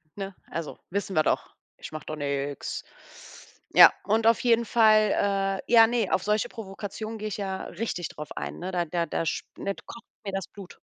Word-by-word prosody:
ne? 195 Hz, -2 st, -6 dB
Also, 165 Hz, -2 st, -5 dB
wissen 200 Hz, 0 st, -3 dB
wir 155 Hz, -, +4 dB
doch. -, -, -1 dB, 0.2 s
Ich -, -, -9 dB
mache 155 Hz, -, -7 dB
doch 155 Hz, -, -4 dB
nix. 140 Hz, -1 st, -3 dB, 0.9 s
Ja, -, -, +10 dB
und 220 Hz, +2 st, +2 dB
auf 230 Hz, -, +5 dB
jeden 235 Hz, -2 st, +3 dB
Fall, 205 Hz, -3 st, +3 dB
äh -, -, -8 dB
ja 225 Hz, -1 st, +8 dB
ne, 230 Hz, -4 st, 0 dB
auf 185 Hz, -, +2 dB
solche 210 Hz, 0 st, +1 dB
Provokationen 215 Hz, +1 st, -6 dB
gehe 215 Hz, 0 st, -4 dB
ich 205 Hz, -, -4 dB
ja 190 Hz, -2 st, -3 dB
richtig 175 Hz, -3 st, -4 dB
drauf 150 Hz, -, -9 dB
ein, -, -, -5 dB
ne? 185 Hz, +2 st, -4 dB
Da 175 Hz, -1 st, 0 dB
da 170 Hz, +1 st, -1 dB
da 165 Hz, -, -2 dB
sch -, -, -1 dB
ne, 200 Hz, -, -2 dB
kocht 235 Hz, -, -11 dB, 0.2 s
mir 195 Hz, -, -4 dB
das 195 Hz, -1 st, -3 dB
Blut. 195 Hz, -3 st, -12 dB
195 Hz, 200 wpm, -27 LUFS, 175-215 Hz, 0.9 s, Ja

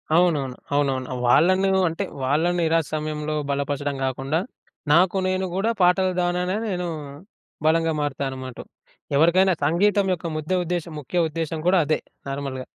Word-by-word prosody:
అవునవును. 150 Hz, -7 st, +2 dB, 0.2 s
అవునవును. 135 Hz, -3 st, 0 dB, 0.2 s
వాళ్ళను 185 Hz, +9 st, +4 dB, 0.2 s
అంటే 165 Hz, -, -3 dB, 0.2 s
వాళ్ళను 160 Hz, +6 st, +1 dB
నిరాశ 165 Hz, -1 st, +2 dB
సమయంలో 155 Hz, 0 st, -3 dB, 0.2 s
బలపరచడం 140 Hz, 0 st, -2 dB
గాకుండా. 135 Hz, +5 st, -1 dB, 0.5 s
నాకు 180 Hz, +4 st, +4 dB
నేను 185 Hz, 0 st, 0 dB
గూడా 220 Hz, +4 st, +1 dB
పాటలు 185 Hz, +1 st, +4 dB
ద్వారానే 180 Hz, +2 st, 0 dB
నేను 180 Hz, -3 st, -2 dB, 0.8 s
బలంగా 165 Hz, +1 st, +3 dB
మారుతాననమాటు. 130 Hz, -3 st, -4 dB, 0.5 s
ఎవరికైనా 175 Hz, +5 st, +4 dB
సంగీతం 200 Hz, +6 st, +3 dB
యొక్క 175 Hz, -1 st, -4 dB
ముద్ద 155 Hz, +3 st, -5 dB
ఉద్దేశ్యం 170 Hz, -1 st, -3 dB
ముఖ్య 165 Hz, +5 st, 0 dB
ఉద్దేశ్యం 160 Hz, 0 st, -3 dB
గూడా 185 Hz, 0 st, +5 dB
అదే 155 Hz, -, +1 dB, 0.3 s
నార్మల్‌గా. 135 Hz, -2 st, -4 dB
165 Hz, 125 wpm, -23 LUFS, 145-180 Hz, 0.8 s, గూడా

